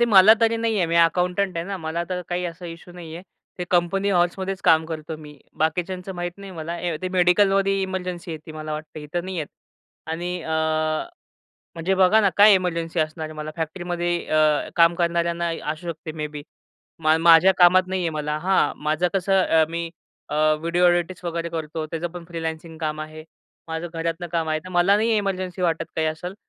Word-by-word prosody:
ते - - +6
मला 215 -1 +8
तरी 230 0 +3
नाहीये. 225 -5 0
मी 165 +1 0
अकाउंटंट 180 +2 +2
आहे 165 - -2
ना. 200 0 -3
मला 160 0 -3
तर 180 -1 -2
काही 180 0 -2
असा 175 +1 -6
इश्यू 170 +1 -10
नाहीये. 170 -1 -9 0.4
ते 180 - -2
कंपनी 185 +3 +1
हॉवर्समध्येच 190 +1 0
काम 160 0 +5
करतो 160 0 -6
मी. 150 -2 -13 0.2
बाकीच्यांचं 180 +3 -2
माहीत 175 +1 -5
नाही 200 -1 -9
मला. 165 0 -5
ए 170 -2 -2
ते 185 - -1
मेडिकलमध्ये 195 +2 +3
इमर्जन्सी 185 -2 -4
येती 155 0 -8
मला 155 0 -6
वाटतं. 155 0 -7
इथं 165 +4 -4
नाही 190 0 -5
येत. 155 -3 -2 0.6
आणि 170 +2 -3
अ, 160 - -4 1.2
म्हणजे 170 +3 0
बघा 190 +3 +5
ना 200 - +4
काय 205 +1 +8
एमर्जन्सी 170 -2 -1
असणार 155 0 -2
आहे 155 - -9
मला? 155 0 -5
फॅक्टरीमध्ये 175 +2 -2
अ, 155 -1 +2
काम 170 0 +5
करणाऱ्यांना 170 0 0
इ 165 - -5
असू 160 +3 -11
शकते 160 -1 -6
मे 150 - -1
बी. 150 -1 -8 0.6
मा 155 0 +4
माझ्या 170 +3 +7
कामात 180 +1 +7
नाहीये 185 -3 -1
मला 150 0 -2
हां, 185 -2 +2
माझं 155 +4 +1
कसं 195 0 +2
अ, 160 -1 +4
मी 170 0 -4 0.4
अ, - - -4 0.3
व्हिडिओ 170 +2 +1
ऑडिटच 175 +1 0
वगैरे 170 0 -3
करतो, 160 -1 -4
त्याचं 165 +2 -4
पण 175 0 -9
फ्रीलान्सिंग 160 -1 -5
काम 155 -1 -3
आहे. 155 0 -8 0.4
माझं 160 +1 -3
घरातनं 165 +1 -3
काम 165 -2 0
आहे. 155 0 +1
तर 185 - -8
मला 180 +3 +4
नाही 220 +1 +2
इमर्जन्सी 185 -2 -2
वाटत 165 -1 +1
काही 160 - +1
असेल. 160 +4 -4
170 Hz, 190 wpm, -23 LUFS, 160-185 Hz, 1.2 s, मला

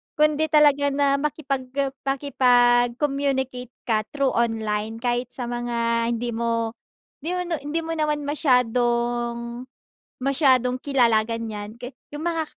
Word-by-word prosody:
kundi 305 0 +3
talaga 290 -2 +4
na 280 0 +2
makipagka 275 -2 -2 0.2
makipag-communicate 255 0 +1
ka 215 -2 0
through 275 0 0
online, 220 -2 -1
kahit 245 0 0
sa 245 -2 -4
mga 235 -1 0
hindi 240 +1 -3
mo 230 0 -1 0.5
hindi 340 +5 -3
mo - - -1
no 340 -3 -3
hindi 295 +3 -2
mo 325 - -4
naman 300 -2 -1
masyadong 240 -3 0 0.5
masyadong 260 -2 +3
kilala 240 -5 +3
ganiyan 220 -2 -5
ka 245 - -5 0.2
yung 295 - -5
mga 330 -1 -1
250 Hz, 125 wpm, -24 LUFS, 235-285 Hz, 0.5 s, talaga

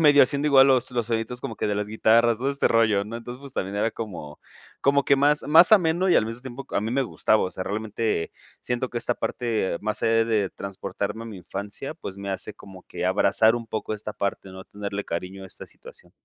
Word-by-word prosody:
medio 145 -2 +7
haciendo 140 +3 +2
igual 135 -2 +7
los 130 -2 +2
los 120 -2 -1
soniditos 115 +1 -2
como 115 - -5
que - - -2
de 105 - 0
las 105 0 -2
guitarras, 115 +1 +3
todo 130 +3 -1
este 140 0 +1
rollo, 110 -3 +3
¿no?, 110 +3 -6
entonces, 120 +2 -8
pues, 140 -2 -9
también 95 -2 -3
era 110 +2 +1
como 85 -11 -7 0.4
como 140 0 +3
que 140 - +4
más 145 +2 +3
más 160 +7 +6
ameno, 180 -2 +4
y 180 - +5
al - - +3
mismo 115 +2 -6
tiempo 130 +1 -8
a - - 0
mí 110 +2 -3
me 135 +3 +1
gustaba, 110 -3 +1
o 95 - -2
sea, 95 +1 -5
realmente, 110 -3 -2 0.3
siento 125 +1 -2
que 120 - -3
esta 120 - -1
parte 110 -9 -2
más 110 0 -3
allá 115 0 +3
de 105 -4 0
transportarme 100 +2 -5
a - - -8
mi 110 -3 -8
infancia, 100 - -6
pues, 100 - -8
me 100 0 -5
hace 95 +2 -4
como 95 -2 -13
que - - -6
abrazar 110 +1 +3
un 115 - -6
poco 110 0 -4
esta 105 0 -6
parte, 100 -1 -3
¿no?, 95 0 -10
tenerle 100 0 -5
cariño 90 +3 -5
a - - -8
esta - - -10
situación. - - -15
115 Hz, 235 wpm, -25 LUFS, 100-130 Hz, 0.4 s, medio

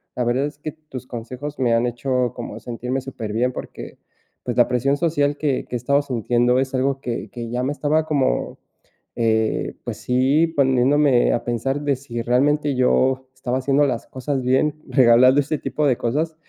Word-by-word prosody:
la 125 - -1
verdad 125 +4 +1
es 145 - -10
que 155 0 -5
tus 150 -5 -10
consejos 130 +5 -7
me 120 -2 +2
han 115 +1 +2
hecho 125 +1 -1
como - - -7
sentirme 125 +2 -4
súper 115 -5 -6
bien, 125 +3 +1
porque, - - -8 0.5
pues, - - -3
la - - +5
presión 135 +3 +1
social 145 -3 +1
que 140 -4 -1
que - - -5
he - - +1
estado 140 +2 +3
sintiendo, 120 -1 +1
es 135 0 -2
algo 135 +1 0
que 120 -3 -4
que 120 -2 -6
ya 125 +1 -2
me 140 +3 -1
estaba 155 +2 0
como, 140 - -1 0.6
eh, 110 -1 0
pues - - -5
sí, 135 +6 +2
poniéndome 135 -2 +3
a 120 - -1
pensar 130 +4 -1
de 145 -2 +1
si 120 -3 -6
realmente 145 +4 +1
yo 130 +1 +2
estaba 130 0 -2
haciendo 140 +2 +2
las 120 -3 -3
cosas 135 +1 -3
bien, 145 +4 +1
regalando 130 +1 +5
este 145 +2 -2
tipo 135 +3 -2
de 125 - +2
cosas, 155 +7 -1
130 Hz, 185 wpm, -21 LUFS, 120-145 Hz, 0.6 s, la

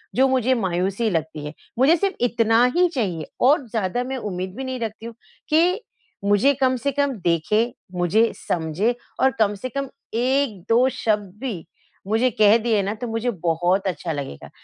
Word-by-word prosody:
जो 265 +2 +5
मुझे 260 -1 +2
मायूसी 195 +2 0
लगती 160 -4 -3
है। 150 - -6 0.3
मुझे 285 +6 +6
सिर्फ़ 395 +1 -1
इतना 230 -1 +3
ही 360 0 +5
चाहिए 180 - -1 0.2
और 275 0 +4
ज़्यादा 220 +2 -1
मैं 260 +1 -4
उम्मीद 185 -3 -5
भी 265 - -5
नहीं 260 -1 -4
रखती 225 0 -5
हूँ 235 - -8 0.3
कि 350 +7 +3 0.4
मुझे 205 +8 +4
कम 260 0 +3
से 280 +4 -1
कम 285 0 +1
देखे, 175 +7 +2 0.3
मुझे 180 +6 +2
समझे 175 +8 -1 0.2
और 265 0 +4
कम 210 -2 +3
से 255 +6 -6
कम 275 +1 -4 0.2
एक 250 -2 +1
दो 240 +3 +5
शब्द 210 -6 -1
भी 215 -11 -4 0.4
मुझे 225 +5 +2
कह 210 +1 +5
दिए 220 -3 +1
ना 200 +2 -2
तो 240 +3 -5
मुझे 225 +2 -1
बहुत 175 +4 +1
अच्छा 170 -1 -3
लगेगा। 140 - -6
225 Hz, 175 wpm, -22 LUFS, 190-255 Hz, 0.4 s, मुझे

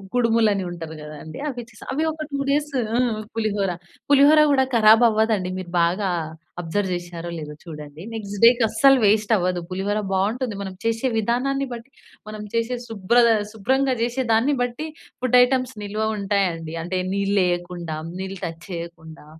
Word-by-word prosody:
కుడుములు 230 -2 +3
అని 195 -1 -2
ఉంటది 165 -2 -7
గదండీ, 150 +1 -9
అవి 245 -3 -5
చేసాం. 215 - -14
అవి 305 +4 0
ఒక 310 0 -6
2 280 - -2
డేసు 290 0 0 0.2
ఆ! - - +2 0.4
పులిహోర. 205 -3 0 0.4
పులిహోర 285 +2 +7
గూడా 265 -1 +4
కరాబ్ 220 +1 +7
అవ్వదండి. 215 -4 +1
మీరు 185 -2 -7
బాగా 185 +4 +1 0.5
అబ్జర్వ్ 185 +3 -2
జేసారో 175 -1 -5
లేదో 150 -1 -7
చూడండి. 150 -2 -9
నెక్స్ట్ 205 -2 -5
డేకి 235 +1 +7
అస్సలు 270 +5 +5
వేస్ట్ 210 +1 +3
అవ్వదు. 180 -2 0
పులిహోర 195 +3 -1
బావుంటుంది. 215 +4 0
మనం 190 -1 -5
చేసే 230 +3 +1
విధానాన్ని 260 +5 0
బట్టి. 235 +3 -10 0.4
మనం 215 0 -7
చేసే 230 +2 0
శుభ్రత 225 +3 +3 0.2
శుభ్రంగా 260 +5 +1
జేసే 245 +3 0
దాన్ని 240 +6 +3
బట్టి 245 +5 -2 0.4
ఫుడ్ 250 -1 +4
ఐటెమ్స్ 255 0 0
నిల్వ 205 +1 -4 0.2
ఉంటాయండి. 190 -5 -1
అంటే 175 +3 -3 0.2
నీళ్లేయకుండా, 180 -4 -1 0.2
నీళ్ళు 190 +1 -5
టచ్ 165 0 -6
చేయకుండా, 170 -2 -8
210 Hz, 150 wpm, -23 LUFS, 180-245 Hz, 0.5 s, పులిహోర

